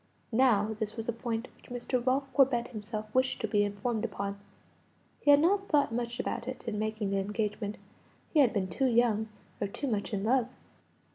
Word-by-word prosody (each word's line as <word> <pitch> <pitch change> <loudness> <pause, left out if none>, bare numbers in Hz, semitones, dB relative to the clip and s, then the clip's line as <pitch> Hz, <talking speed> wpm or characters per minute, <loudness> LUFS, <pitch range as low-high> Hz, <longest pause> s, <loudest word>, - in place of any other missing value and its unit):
Now 220 -3 +3
this 215 0 -3
was 225 - -4
a 235 - 0
point 230 +1 -3
which - - -20
Mr. 245 0 -2
Ralph 265 +2 +1
Corbet 250 -3 +3
himself 215 -1 -6
wished 260 0 +2
to - - 0
be 205 -1 +3
informed 205 +3 -2
upon. 200 -2 -3 0.8
He 290 - 0
had 285 0 +9
not 390 +5 +2
thought 290 -6 +3
much 240 +1 -2
about 240 -1 -3
it 255 -1 -6
in 210 -2 -2
making 215 -2 -2
the 195 - +1
engagement; 210 +1 -2 0.6
he 310 - +4
had 260 -6 +6
been 200 -5 0
too 260 +9 +1
young, 230 -3 +2 0.3
or 205 - +1
too 200 - -5
much 215 -5 -1
in 200 -2 -1
love. 245 +1 +3
230 Hz, 195 wpm, -30 LUFS, 210-255 Hz, 0.8 s, had